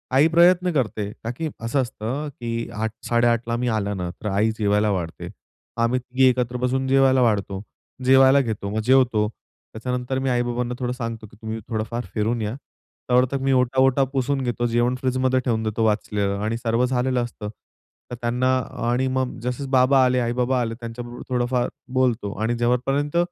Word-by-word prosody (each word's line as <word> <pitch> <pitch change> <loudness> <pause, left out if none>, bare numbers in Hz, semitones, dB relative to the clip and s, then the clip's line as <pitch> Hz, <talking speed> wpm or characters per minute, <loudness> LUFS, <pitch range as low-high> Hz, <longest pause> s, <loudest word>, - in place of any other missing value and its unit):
आई 140 +4 +6
प्रयत्न 180 +1 +5
करते 110 -6 -1
ताकी 130 +8 -3
असं 120 +4 0
असतं, 130 +4 -4
की 115 -3 -4
8:00-8:30 115 +2 0
ला 115 - 0
मी 125 +1 -1
आल्यानंतर 100 -4 -2
आई 105 +3 +2
जेवायला 105 0 +2
वाढते. 85 -4 -4 0.5
आम्ही 115 +2 +2
तिघे 130 +1 +2
एकत्र 125 -1 -1
बसून 130 +1 0
जेवायला 135 -1 +4
वाढतो, 100 -4 0 0.4
जेवायला 135 +1 +6
घेतो, 110 -5 -3
मग 110 +2 -2
जेवतो. 125 -4 +3 0.5
त्याच्यानंतर 125 +3 -3
मी 135 0 -1
आई-बाबांना 120 0 -1
थोडं 125 -1 -1
सांगतो, 115 -3 -5
की 105 - -19
तुम्ही 110 0 -4
थोडं-फार 115 +1 -3
फिरून 110 +2 0
या 105 0 -2 0.6
तोवर 125 +1 +5
तर 140 - 0
मी 135 0 +1
ओटा-वोटा 130 +1 +3
पुसून 135 +1 0
घेतो, 120 -1 -1
जेवण 120 +2 +1
फ्रिजमध्ये 130 0 +1
ठेवून 115 -3 -1
देतो, 110 +1 -1
वाचलेलं 105 -2 0
आणि 110 +2 -1
सर्व 115 +1 +1
झालेलं 125 -1 0
असतं. 110 -3 -6 0.6
तर - - -3
त्यांना 125 +2 +1 0.3
आणि 125 +2 +1
मग 130 -1 -1
जसं 125 +2 -3
बाबा 130 0 +5
आले, 125 0 +2
आई-बाबा 125 +2 0
आले 115 -1 -2
त्यांच्याबरोबर 120 0 -7
थोडंफार 125 0 0 0.3
बोलतो 120 -5 +1
आणि 115 +2 +1
जेव्हापर्यंत 135 +6 0
120 Hz, 160 wpm, -23 LUFS, 115-130 Hz, 0.6 s, आई